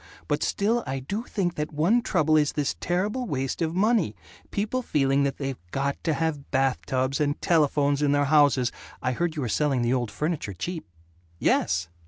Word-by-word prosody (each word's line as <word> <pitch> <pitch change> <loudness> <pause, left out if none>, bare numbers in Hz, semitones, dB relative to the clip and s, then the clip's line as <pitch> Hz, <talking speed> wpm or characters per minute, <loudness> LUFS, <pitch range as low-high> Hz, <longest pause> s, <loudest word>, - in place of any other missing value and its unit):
But - - 0
still 225 +4 +1
I 135 +1 -2
do 200 - -4
think 185 -7 -1
that 150 -2 -3
one 170 +11 +3
trouble 155 -8 +2
is 150 -2 +3
this 145 -2 -1
terrible 205 +8 -1
waste 135 -1 -2
of 165 0 -1
money, 200 - +2 0.3
people 215 +5 -1
feeling 140 - +1
that 140 - -2
they've 135 - -4
got 140 +6 -2
to 160 - +2
have 160 -3 -2
bath 135 -1 +1
tubs 130 +2 0
and 145 -1 0
telephones 145 -3 +2
in 145 -1 +3
their 145 0 +3
houses 140 -4 +4 0.3
I 125 - +1
heard 170 +5 -1
you 150 - -2
were - - -1
selling 135 +1 +1
the 120 +1 +2
old 120 -3 0
furniture 150 - -3
cheap." 160 - -5 0.5
"Yes!" 85 0 +1
145 Hz, 190 wpm, -26 LUFS, 135-175 Hz, 0.5 s, houses